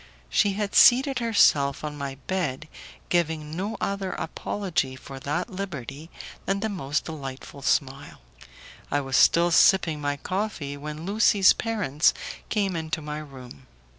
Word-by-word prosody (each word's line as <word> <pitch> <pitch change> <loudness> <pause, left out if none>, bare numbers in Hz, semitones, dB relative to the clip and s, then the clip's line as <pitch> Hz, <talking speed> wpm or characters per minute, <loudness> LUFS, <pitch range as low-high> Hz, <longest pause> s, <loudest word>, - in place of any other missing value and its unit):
She 200 - +3
had 205 0 -3
seated 265 +2 +6
herself 150 - +3
on 150 -1 -4
my 140 -2 -5
bed, 160 -6 -2 0.4
giving 160 -3 -1
no 200 +5 -3
other 200 -1 -2
apology 160 -5 -3
for 135 +1 -10
that 145 - -3
liberty 160 -6 -6 0.4
than 195 +1 0
the 220 - -1
most 155 -7 -2
delightful 140 -3 -8
smile. 135 0 -1 0.7
I 145 - +1
was 135 -2 -3
still 170 +7 +5
sipping 165 -3 +4
my 145 0 -1
coffee, 185 -5 -3
when 150 +2 -7
Lucie's 200 -1 +5
parents 195 - +1 0.3
came 200 -4 0
into 160 -1 -3
my 150 0 -5
room. 130 - -12
160 Hz, 135 wpm, -25 LUFS, 140-195 Hz, 0.7 s, seated